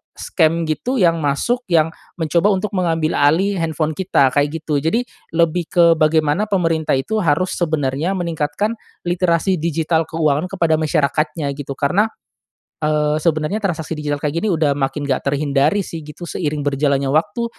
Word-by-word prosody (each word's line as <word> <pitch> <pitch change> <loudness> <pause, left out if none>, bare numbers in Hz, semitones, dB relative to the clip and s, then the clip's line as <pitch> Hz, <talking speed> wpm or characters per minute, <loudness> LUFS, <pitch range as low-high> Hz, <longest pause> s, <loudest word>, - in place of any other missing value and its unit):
scam 165 0 +1
gitu 240 +12 -2
yang 170 -3 +3
masuk 145 - 0
yang 160 -1 +3 0.3
mencoba 165 +4 +2
untuk 195 +1 -1
mengambil 165 -4 0
alih 170 +8 +3
handphone 160 -1 -1
kita 180 -7 +2
kayak 145 +3 0
gitu. 150 -2 -1
Jadi 165 - 0 0.3
lebih 170 0 +1
ke 170 -2 +5
bagaimana 155 +5 +2
pemerintah 165 -6 +1
itu 215 +11 -2
harus 170 +3 +1
sebenarnya 155 -1 -1
meningkatkan 170 +4 -2 0.3
literasi 175 +1 +1
digital 165 0 0
keuangan 155 0 0
kepada 170 -4 +2
masyarakatnya 155 0 0
gitu 140 -1 -6
karena, 180 +10 +2 0.7
eee, 150 0 +1
sebenarnya 155 +4 0
transaksi 165 -5 -2
digital 145 -1 -2
kayak 150 +2 -2
gini 215 - 0
udah 155 -3 +2
makin 135 +1 -2
enggak 130 - -1
terhindari 145 +5 +1
sih 165 - -7
gitu 150 +3 -9
seiring 150 -2 -2
berjalannya 140 -1 +1
waktu 205 +9 0
160 Hz, 150 wpm, -19 LUFS, 150-175 Hz, 0.7 s, ke